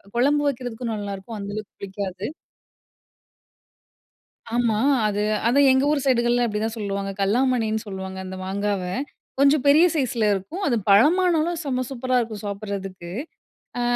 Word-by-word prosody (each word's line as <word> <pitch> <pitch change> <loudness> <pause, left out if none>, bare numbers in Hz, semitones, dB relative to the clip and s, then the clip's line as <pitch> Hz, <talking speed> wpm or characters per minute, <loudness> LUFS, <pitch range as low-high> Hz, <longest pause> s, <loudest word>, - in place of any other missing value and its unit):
குழம்பு 290 +4 +3
வைக்கிறதுக்கும் 245 -3 -4
நல்லாருக்கும். 205 +2 -6
அந்த 200 0 -5
அளவுக்கு 215 -1 -7
புளிக்காது. 195 -1 -5 2.3
ஆமா, 235 -3 +2 0.3
அது 205 0 -1 0.3
அதா 255 +4 +3
எங்க 265 +1 +3
ஊர் 290 -2 +1
சைடுகள்ல 240 -1 +3
அப்படிதான் 220 +1 -2
சொல்லுவாங்க. 200 -1 -3
கல்லாமணின்னு 220 +1 +1
சொல்லுவாங்க, 190 -1 -6
அந்த 190 0 -6
மாங்காவ. 200 0 -1 0.6
கொஞ்சம் 280 0 +4
பெரிய 310 +5 +7
சைஸில 250 -7 0
இருக்கும். 200 - -4
அது 245 - +2
பழமானாலும் 330 - +4
செம்ம 255 -2 -1
சூப்பரா 255 -1 0
இருக்கும். 220 -3 -5
சாப்பிடறதுக்கு. 195 -3 -6 0.7
ஆ - - 0
225 Hz, 125 wpm, -23 LUFS, 200-260 Hz, 2.3 s, பெரிய